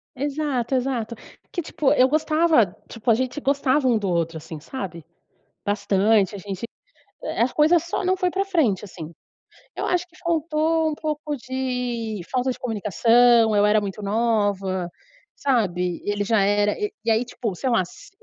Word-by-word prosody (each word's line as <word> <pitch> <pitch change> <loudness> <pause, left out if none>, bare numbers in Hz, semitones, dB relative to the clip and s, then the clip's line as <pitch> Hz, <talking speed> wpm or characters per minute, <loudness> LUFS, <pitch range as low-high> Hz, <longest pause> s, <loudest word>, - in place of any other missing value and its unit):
Exato, 275 -2 -1
exato. 245 -3 -1 0.4
Que 350 - -2
tipo 295 -3 0
eu 255 - +5
gostava, 310 -2 +3 0.2
tipo, 230 +1 -4
a - - +5
gente 255 +4 -2
gostava 280 -1 +1
um 240 -3 +4
do 200 -3 -2
outro 165 -2 -1
assim, 160 0 -8
sabe? 170 - -7 0.6
Bastante 205 0 +2
a - - -5
gente, 195 +2 -6 0.6
eh, - - -2
as 245 +2 +2
coisas 315 +2 +4
só 345 +3 -3
não 370 +1 +3
foi 365 -1 0
pra 390 +2 0
frente, 300 - +1
assim. 165 -4 -9 0.6
Eu - - -3
acho 355 0 0
que 360 0 -23
faltou 320 -1 +1
um - - -3
pouco 300 -1 -3
de 250 -4 -3
falta 255 0 0
de 250 - -5
comunicação, 230 +1 +3
eu 205 0 +4
era 210 +1 +4
muito 205 +1 -5
nova, 200 -4 0 0.5
sabe, 180 -10 0
ele 205 0 -1
já 220 0 +2
era 205 +1 +2 0.3
e 230 - +1
aí 225 +2 +3
tipo, 235 -4 -4
sei 255 +9 -2
lá, 230 -6 +3
se 175 - -14
235 Hz, 170 wpm, -23 LUFS, 205-290 Hz, 0.6 s, eu